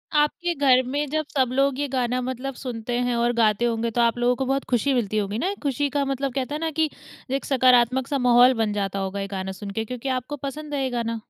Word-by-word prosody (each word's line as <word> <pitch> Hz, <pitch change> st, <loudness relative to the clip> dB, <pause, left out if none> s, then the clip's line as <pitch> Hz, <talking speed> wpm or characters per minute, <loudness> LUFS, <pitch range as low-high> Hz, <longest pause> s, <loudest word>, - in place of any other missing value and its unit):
आपके 320 Hz, +4 st, +1 dB
घर 260 Hz, -2 st, +4 dB
में 290 Hz, +2 st, -1 dB
जब 310 Hz, 0 st, -1 dB
सब 260 Hz, -2 st, +3 dB
लोग 275 Hz, 0 st, +1 dB
ये 290 Hz, -, 0 dB
गाना 250 Hz, -1 st, -1 dB
मतलब 260 Hz, +2 st, -4 dB
सुनते 240 Hz, -2 st, -5 dB
हैं 245 Hz, -1 st, 0 dB
और 240 Hz, +1 st, +1 dB
गाते 225 Hz, 0 st, +3 dB
होंगे, 230 Hz, 0 st, 0 dB
तो 240 Hz, -, +1 dB
आप 235 Hz, 0 st, +2 dB
लोगों 245 Hz, +1 st, +2 dB
को 265 Hz, -, -2 dB
बहुत 270 Hz, +1 st, 0 dB
खुशी 265 Hz, +3 st, +2 dB
मिलती 215 Hz, -4 st, 0 dB
होगी 205 Hz, +1 st, -1 dB
ना? 350 Hz, -, -1 dB
एक 405 Hz, -, -6 dB
खुशी 285 Hz, +1 st, 0 dB
का 285 Hz, -1 st, 0 dB
मतलब 270 Hz, -1 st, -2 dB
कहते 275 Hz, +2 st, -2 dB
है -, -, -3 dB
ना 325 Hz, -1 st, -1 dB
कि, 315 Hz, 0 st, +1 dB, 0.4 s
एक 275 Hz, -, -1 dB
सकारात्मक-सा 255 Hz, +1 st, +3 dB
माहौल 245 Hz, 0 st, +6 dB
बन 210 Hz, -1 st, -1 dB
जाता 195 Hz, -1 st, -2 dB
होगा 195 Hz, +1 st, -3 dB
ये 195 Hz, -, -3 dB
गाना 190 Hz, 0 st, -4 dB
सुन 200 Hz, +1 st, -7 dB
के 220 Hz, +2 st, -3 dB
क्योंकि 250 Hz, +3 st, -5 dB
आपको 275 Hz, +4 st, -7 dB
पसंद 300 Hz, +2 st, -7 dB
है 275 Hz, -1 st, 0 dB
ये 260 Hz, -, 0 dB
गाना। 230 Hz, -2 st, -2 dB
250 Hz, 250 wpm, -24 LUFS, 235-275 Hz, 0.4 s, माहौल